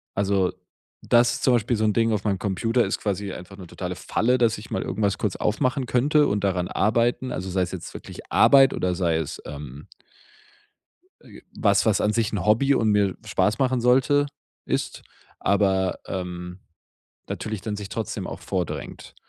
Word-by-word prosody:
also, 100 -2 +1 0.5
das 120 0 +3
ist - - -7
zum 130 - +4
Beispiel 120 0 +1
so 110 - +1
ein 105 - +2
Ding 115 -1 +2
auf 105 -2 -1
meinem 100 -3 0
Computer 115 +5 +1
ist - - -2
quasi 100 -1 -2
einfach 95 +2 -10
'ne 90 -3 -10
totale - - -5
Falle, 125 +3 +1
dass 115 -3 +2
ich 105 - -11
mal - - -1
irgendwas 100 -2 -1
kurz 105 -4 -2
aufmachen 130 +5 0
könnte 145 +5 +3
und 100 0 -1
daran 90 -2 0
arbeiten. 120 +5 +1
Also, 95 +1 -4
sei 95 0 0
es 90 - -4
jetzt - - -7
wirklich - - -10
Arbeit 135 -1 +6
oder 90 -1 -1
sei 85 -3 +1
es, 80 -3 -4
ähm 70 0 -9 1.3
äh, - - -14
was, - - +2
was 110 -2 +2
an 105 - +1
sich 110 -2 0
'n 95 -2 -2
Hobby 135 +6 +4
und 110 -3 +2
mir 100 -2 +2
Spaß 110 +4 +1
machen 130 -2 +1
sollte, 135 +4 +3 0.4
ist, - - -3 0.4
aber, 95 -2 +1
ähm, 90 -1 -5 0.7
natürlich 110 -2 -4
dann 105 -2 -4
sich 100 -2 -7
trotzdem - - -4
auch - - -7
vordrängt. 90 -4 -5
105 Hz, 180 wpm, -24 LUFS, 95-120 Hz, 1.3 s, Arbeit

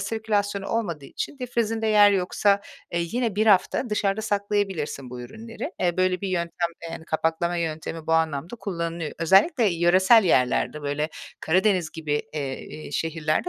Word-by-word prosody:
sirkülasyonu 205 -3 -1
olmadığı 170 -11 -2
için 280 - -6
dipfrizinde 225 -3 -1
yer 210 -1 +6
yoksa, 200 +1 +2 0.3
eee, 170 - 0
yine 225 +4 -2
1 215 - +2
hafta 215 +4 +3
dışarıda 210 0 0
saklayabilirsin 200 - -2
bu 125 - -7
ürünleri. 225 - -7
Eee, 175 -1 +1
böyle 185 -1 +1
bir 195 - -3
yöntem, 170 -1 -1
eee, 170 - -6
yani, 160 - -7
kapaklama 165 +2 -1
yöntemi 160 -1 -4
bu 165 - 0
anlamda 160 +5 0
kullanılıyor. 170 -5 -4
Özellikle 195 - +4
yöresel 185 +4 +5
yerlerde, 135 0 +2
böyle, 145 +2 -1 0.3
Karadeniz 185 0 +2
gibi, 150 -3 -2
eee, 140 -3 -3
iii, 155 -1 -9
şehirlerde 160 0 -1
180 Hz, 150 wpm, -25 LUFS, 160-210 Hz, 0.3 s, yer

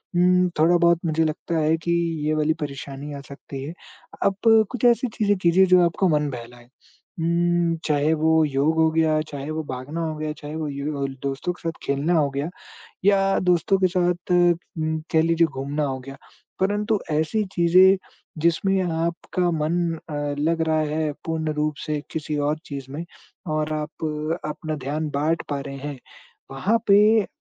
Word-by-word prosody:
उम, 180 +1 +4
थोड़ा-बहुत 170 +1 +4
मुझे 160 0 +1
लगता 160 +2 -2
है 155 +1 +2
कि 170 - -1 0.4
ये 155 - +2
वाली 155 +1 +2
परेशानी 140 0 -6
आ - - -6
सकती 140 -1 -8
है। 155 +4 -6 0.5
अब 195 - +2 0.4
कुछ 250 -2 -6
ऐसी 240 +1 +4
चीज़ें 205 -1 +2
कीजिए 185 +1 +4
जो 180 0 +6
आपको 170 +3 +1
मन 150 -2 +1
बहलाए, 120 -1 -10 0.6
उम, 170 0 +1
चाहे 150 +1 +2
वो 160 +1 +3
योग 145 +2 +1
हो 160 0 +5
गया, 160 -1 +2
चाहे 145 +1 -6
वो 160 0 -3
भागना 130 +6 -4
हो 160 -1 -2
गया, 155 0 -3
चाहे 150 0 -8
वो 160 -1 -3
यू 140 +2 -4
होल 135 -1 -3
दोस्तों 140 +6 -2
के - - -19
साथ 165 - -9
खेलना 140 +5 0
हो 145 -2 +2
गया 140 +4 -3 0.6
या 195 -1 +4
दोस्तों 180 +3 +2
के 185 - +5
साथ 180 0 0
उम, 170 -2 +1
कह 160 - +4
लीजिए 165 0 +3
घूमना 140 +2 -3
हो 135 -2 -2
गया। 135 +1 -10 0.4
परंतु 205 +2 +1
ऐसी 160 +8 +1
चीज़ें 185 +3 +6 0.5
जिसमें 190 +3 +2
आपका 170 +1 -1
मन 160 +2 0 0.3
अ, - - -4 0.3
लग 165 +2 +1
रहा 155 0 +2
है 155 -1 0
पूर्ण 160 -1 -2
रूप 150 0 0
से 150 -1 -1
किसी 155 -1 -3
और 155 - -2
चीज़ 140 -2 -6
में 155 +4 -5 0.5
और 155 0 -1
आप 155 +1 -5 0.4
अपना 155 +1 -4
ध्यान 150 +2 -2
बाँट 155 +4 +1
पा 140 -1 -1
रहे 140 0 -7
हैं, 140 -1 -6 0.5
वहाँ 195 +12 +1
पे 210 +1 +5
160 Hz, 175 wpm, -23 LUFS, 150-175 Hz, 0.6 s, जो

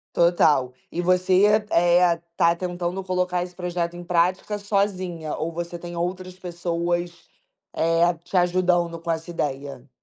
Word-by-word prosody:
Total. 155 -7 +3 0.2
E 175 - -2
você, 185 +2 +3 0.2
eh, 175 0 +4 0.2
tá 170 0 +3
tentando 180 +1 -3
colocar 180 -1 0
esse 180 0 -9
projeto 175 -1 -3
em 175 - -8
prática 180 +4 +1
sozinha 185 -6 -1
ou 165 +2 -2
você 170 +1 -5
tem 175 0 -8
outras 185 +1 -3
pessoas, 175 0 -2 0.6
eh, 165 +2 +3
te 190 - -8
ajudando 175 -1 +2
com 165 0 -3
essa 165 +1 -4
ideia? 140 -4 -4
175 Hz, 140 wpm, -24 LUFS, 170-180 Hz, 0.6 s, eh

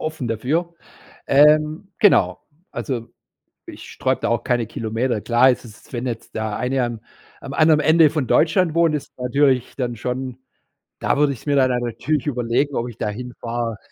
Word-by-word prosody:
offen 155 -5 -4
dafür, 155 +10 -1 0.5
ähm, 155 +6 +4
genau, 205 - +4 0.3
also, 120 -4 -4 0.6
ich - - -10
sträube - - -1
da - - -1
auch 115 0 0
keine 120 -3 0
Kilometer 115 +1 -2
klar, 120 +4 +4
es 125 - -2
ist 110 +2 -15
wenn 120 +1 -3
jetzt 115 -2 -6
der 110 -1 -2
eine 130 0 0
am 120 -2 -5 0.4
am - - -8
anderen 155 -1 +4
Ende 160 -1 +5
von 150 -6 -2
Deutschland 165 0 +3
wohnt, 170 -2 +3
ist 150 - -5
natürlich 130 0 +1
dann 120 -3 -3
schon 125 +2 -4 0.6
da - - 0
würde 145 -1 +3
ich 125 - -11
es - - -19
mir 145 - +2
dann 130 -2 +3
natürlich 135 +5 -2
überlegen, 125 +2 0
ob 120 - -1
ich 115 - -11
da 105 - -2
hinfahre. 120 0 -5
130 Hz, 175 wpm, -21 LUFS, 120-150 Hz, 0.6 s, Ende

